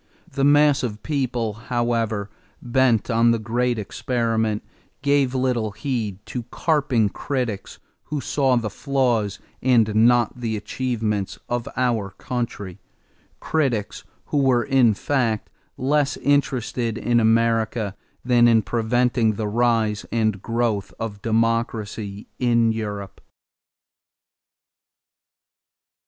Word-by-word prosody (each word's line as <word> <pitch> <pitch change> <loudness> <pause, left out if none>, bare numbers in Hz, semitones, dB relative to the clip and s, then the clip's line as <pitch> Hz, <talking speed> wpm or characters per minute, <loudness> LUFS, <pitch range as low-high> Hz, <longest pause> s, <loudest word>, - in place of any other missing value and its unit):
The 135 - -1
mass 145 0 +5
of 120 -4 -2
the - - -13
people, 125 -5 -2
however, 115 -3 -1 0.3
bent 120 -2 +2
on 115 +1 +4
the 115 - +3
great 120 +2 0
experiment, 110 0 -1 0.4
gave 140 -2 +2
little 125 -5 0
heed 110 -3 -3
to 120 +2 -4
carping 135 -9 +1
critics 120 -5 -4 0.3
who 150 -1 -3
saw 135 -1 +1
the 115 -4 -1
flaws 120 -6 0 0.2
and 115 -4 +3
not 120 +3 +3
the 115 -3 -2
achievements 110 -2 -2
of 120 -1 -2
our 120 -6 +1
country 115 -7 -4 0.6
critics 130 -10 -1 0.2
who - - -2
were 130 -3 +3
in 125 -4 +3
fact 115 -4 -1 0.3
less 145 +2 +1
interested 125 -5 0
in 120 +1 +2
America 115 -2 +1 0.3
than 120 -1 +5
in 115 -2 +4
preventing 120 0 +1
the 105 +1 -3
rise 110 -1 +1
and 110 -4 0
growth 115 -4 -1
of 105 -3 -5
democracy 110 -2 -1
in 115 -2 +3
Europe. 105 -3 -5
115 Hz, 110 wpm, -23 LUFS, 110-125 Hz, 0.6 s, mass